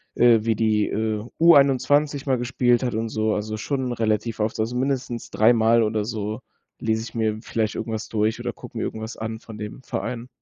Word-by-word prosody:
äh, 120 Hz, -1 st, +6 dB
wie 115 Hz, -, +2 dB
die, 110 Hz, -1 st, +2 dB
äh, 110 Hz, -1 st, -1 dB, 0.2 s
U21 145 Hz, -2 st, +4 dB
mal 130 Hz, -2 st, +2 dB
gespielt 120 Hz, 0 st, +1 dB
hat 125 Hz, -3 st, -1 dB
und 115 Hz, +1 st, -2 dB
so, 110 Hz, 0 st, 0 dB
also 110 Hz, +1 st, -3 dB
schon 130 Hz, +2 st, -2 dB
relativ 110 Hz, 0 st, -1 dB
oft, 110 Hz, +1 st, -1 dB
also 115 Hz, +3 st, -1 dB
mindestens 125 Hz, -2 st, -2 dB
dreimal 115 Hz, +1 st, +4 dB
oder 105 Hz, -1 st, 0 dB
so, 110 Hz, +1 st, -4 dB, 0.4 s
lese 110 Hz, -1 st, 0 dB
ich 120 Hz, -, -10 dB
mir 110 Hz, -1 st, 0 dB
vielleicht 110 Hz, -2 st, -1 dB
irgendwas 110 Hz, -1 st, -4 dB
durch 110 Hz, 0 st, 0 dB
oder -, -, -3 dB
gucke -, -, -11 dB
mir -, -, -1 dB
irgendwas 110 Hz, +1 st, -5 dB
an 110 Hz, 0 st, -4 dB
von 110 Hz, -2 st, -11 dB
dem 105 Hz, +4 st, -7 dB
Verein. 125 Hz, -1 st, -4 dB
115 Hz, 190 wpm, -23 LUFS, 110-125 Hz, 0.4 s, äh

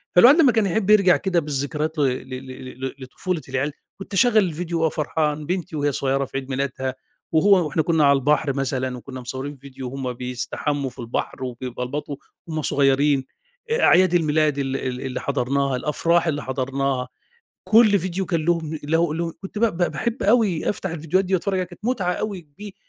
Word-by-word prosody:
فالواحد 245 Hz, -, +8 dB
لمّا 275 Hz, -5 st, +6 dB
كان 220 Hz, -2 st, +2 dB
يحب 195 Hz, +2 st, 0 dB
يرجع 195 Hz, -4 st, +6 dB
كده 185 Hz, -3 st, +1 dB
بالذكريات 150 Hz, +1 st, -2 dB
ل -, -, +3 dB
ل 130 Hz, -2 st, 0 dB, 0.2 s
ل 130 Hz, 0 st, -10 dB
ل 135 Hz, -, -2 dB
ل -, -, -8 dB
لطفولة 160 Hz, +6 st, -4 dB
العيال، 135 Hz, +3 st, -1 dB, 0.3 s
كنت 195 Hz, -, -9 dB
أشغّل 225 Hz, +3 st, +4 dB
الفيديو، 175 Hz, -3 st, +1 dB
وأبقى 160 Hz, -1 st, +2 dB
فرحان 150 Hz, 0 st, -1 dB
بنتي 180 Hz, -1 st, -3 dB
وهي 145 Hz, -1 st, +1 dB
صغيرة 135 Hz, 0 st, 0 dB
في 135 Hz, -, -6 dB
عيد 135 Hz, 0 st, -5 dB
ميلادها، 130 Hz, -1 st, -2 dB, 0.4 s
وهو 180 Hz, +2 st, +5 dB
وإحنا 155 Hz, +2 st, 0 dB
كنا 160 Hz, -3 st, +3 dB
على 140 Hz, 0 st, +6 dB
البحر 145 Hz, 0 st, +1 dB
مثلًا، 130 Hz, -2 st, -2 dB
وكنا 130 Hz, +1 st, -8 dB
مصورين 135 Hz, +3 st, -5 dB
فيديو 130 Hz, -1 st, -8 dB
وهم 130 Hz, -1 st, -4 dB
بيستحمّوا 125 Hz, +3 st, -3 dB
في -, -, -18 dB
البحر، 120 Hz, +2 st, -4 dB
وبيبلبطوا 125 Hz, +3 st, -4 dB, 0.3 s
وهم 155 Hz, -1 st, -3 dB
صغيرين، 140 Hz, -1 st, +2 dB, 0.5 s
آآ 465 Hz, -, +2 dB
أعياد 180 Hz, 0 st, +5 dB
الميلاد 155 Hz, -3 st, +2 dB
ال 135 Hz, -1 st, -1 dB
ال 125 Hz, -1 st, -4 dB
اللي 130 Hz, -2 st, -4 dB
حضرناها، 140 Hz, 0 st, 0 dB
الأفراح 165 Hz, +5 st, +1 dB
اللي 145 Hz, -2 st, -1 dB
حضرناها، 130 Hz, 0 st, -1 dB, 0.6 s
كُلّ 215 Hz, -2 st, +5 dB
فيديو 185 Hz, +2 st, -3 dB
كان 165 Hz, -3 st, -1 dB
لهم 160 Hz, -2 st, 0 dB
له 165 Hz, +1 st, +1 dB
له 165 Hz, 0 st, -2 dB
كنت 195 Hz, +2 st, -6 dB
ب 235 Hz, -, +3 dB
ب 175 Hz, 0 st, +1 dB
باحب 235 Hz, +2 st, -2 dB
أوي 210 Hz, -6 st, +2 dB
أفتح 190 Hz, -2 st, -4 dB
الفيديوهات 165 Hz, +4 st, 0 dB
دي، 190 Hz, +1 st, 0 dB
وأتفرّج 195 Hz, +2 st, 0 dB
عليها 185 Hz, -1 st, 0 dB
كانت 180 Hz, +4 st, -15 dB
متعة 200 Hz, -8 st, 0 dB
أوي 200 Hz, -2 st, -3 dB
كبي 175 Hz, +6 st, -12 dB
150 Hz, 185 wpm, -23 LUFS, 135-180 Hz, 0.6 s, فالواحد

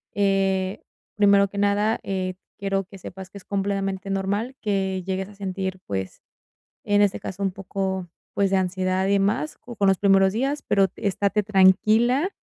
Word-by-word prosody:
Eh, 195 Hz, -1 st, +1 dB, 0.3 s
primero 200 Hz, -1 st, +5 dB
que 200 Hz, -, -5 dB
nada, 205 Hz, +2 st, +2 dB
eh, 185 Hz, -1 st, -2 dB, 0.2 s
quiero 195 Hz, -1 st, -1 dB
que 195 Hz, 0 st, -13 dB
sepas 185 Hz, +1 st, -9 dB
que 200 Hz, -, -11 dB
es 195 Hz, -, -12 dB
completamente 195 Hz, 0 st, -2 dB
normal 200 Hz, +6 st, -1 dB
que 190 Hz, -3 st, -1 dB
llegues 190 Hz, 0 st, -2 dB
a 210 Hz, -, -14 dB
sentir, 190 Hz, -1 st, -4 dB
pues, 95 Hz, -1 st, -4 dB, 0.6 s
en 205 Hz, 0 st, +3 dB
este 205 Hz, -2 st, +2 dB
caso, 190 Hz, +1 st, -7 dB
un 195 Hz, -, +1 dB
poco, 190 Hz, -1 st, -3 dB, 0.3 s
pues, 200 Hz, -1 st, +2 dB
de 195 Hz, -, +3 dB
ansiedad 185 Hz, 0 st, 0 dB
y 200 Hz, -, +2 dB
demás, 200 Hz, +10 st, 0 dB
con 230 Hz, -5 st, -2 dB
los 190 Hz, -1 st, +4 dB
primeros 195 Hz, -1 st, +4 dB
días, 270 Hz, +7 st, -1 dB
pero 195 Hz, -1 st, +4 dB
estate 200 Hz, +1 st, 0 dB
tranquila, 215 Hz, -, +4 dB
195 Hz, 165 wpm, -24 LUFS, 190-205 Hz, 0.6 s, primero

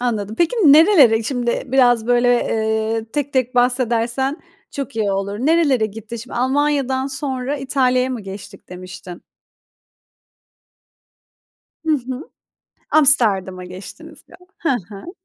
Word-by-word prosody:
anladım. 220 Hz, -4 st, -2 dB
Peki, 340 Hz, +8 st, +1 dB
nerelere 290 Hz, -, +6 dB
şimdi 240 Hz, 0 st, -2 dB
biraz, 245 Hz, -3 st, +3 dB
böyle, 245 Hz, 0 st, +2 dB
eee, 220 Hz, -2 st, 0 dB
tek 290 Hz, -1 st, -3 dB
tek 255 Hz, -1 st, 0 dB
bahsedersen 245 Hz, +2 st, 0 dB, 0.3 s
çok 275 Hz, -5 st, -6 dB
iyi 210 Hz, -3 st, 0 dB
olur. 195 Hz, +1 st, -3 dB
Nerelere 280 Hz, -4 st, +2 dB
gittin 225 Hz, +2 st, -9 dB
şimdi? 235 Hz, +2 st, -9 dB
Almanya'dan 265 Hz, 0 st, 0 dB
sonra 270 Hz, 0 st, -4 dB
İtalya'ya 260 Hz, -2 st, 0 dB
mı 250 Hz, -3 st, -4 dB
geçtik 195 Hz, 0 st, -11 dB
demiştin? 180 Hz, -1 st, -10 dB, 2.6 s
Hı 315 Hz, -, +2 dB
hı. 260 Hz, +2 st, -6 dB, 0.6 s
Amsterdam'a 210 Hz, -11 st, +3 dB
geçtiniz 185 Hz, +2 st, -11 dB
ya. -, -, -16 dB, 0.2 s
Hı 330 Hz, -, -1 dB, 0.2 s
hı. 205 Hz, -, -10 dB
245 Hz, 115 wpm, -19 LUFS, 220-270 Hz, 2.6 s, nerelere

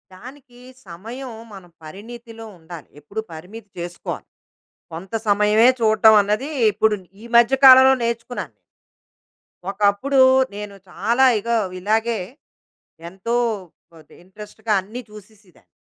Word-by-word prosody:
దానికి, 250 Hz, +2 st, -15 dB, 0.3 s
సమయం 230 Hz, +10 st, -9 dB, 0.2 s
మనం 185 Hz, -3 st, -13 dB
పరిణితిలో 225 Hz, +6 st, -11 dB
ఉండాలి. 165 Hz, -1 st, -12 dB
ఎప్పుడు 200 Hz, +9 st, -6 dB
పరిమితి 200 Hz, +7 st, -11 dB
చేస్కోవాలి. 175 Hz, 0 st, -7 dB, 0.7 s
కొంత 180 Hz, +5 st, -9 dB
సమయమే 210 Hz, +3 st, +4 dB
చూడటం 220 Hz, -1 st, +5 dB
అన్నది, 210 Hz, +8 st, -2 dB, 0.2 s
ఇప్పుడు 215 Hz, +1 st, +1 dB, 0.3 s
ఈ -, -, -10 dB
మధ్య 235 Hz, +3 st, +4 dB
కాలంలో 260 Hz, 0 st, +9 dB
నేర్చుకున్నాను... 235 Hz, +1 st, -4 dB, 1.2 s
ఒకప్పుడు, 205 Hz, +7 st, 0 dB, 0.4 s
నేను 205 Hz, -1 st, -8 dB
చాలా 235 Hz, +8 st, +1 dB
ఇగో 235 Hz, +2 st, -1 dB, 0.2 s
ఇలాగే, 220 Hz, +4 st, -1 dB, 0.9 s
ఎంతో, 195 Hz, +6 st, -4 dB, 0.6 s
వదే 155 Hz, -2 st, -18 dB
ఇంట్రెస్ట్‌గా 210 Hz, +3 st, -9 dB
అన్ని 225 Hz, +6 st, -9 dB
చూసేసేదాన్ని. 205 Hz, -, -18 dB
215 Hz, 100 wpm, -20 LUFS, 195-235 Hz, 1.2 s, కాలంలో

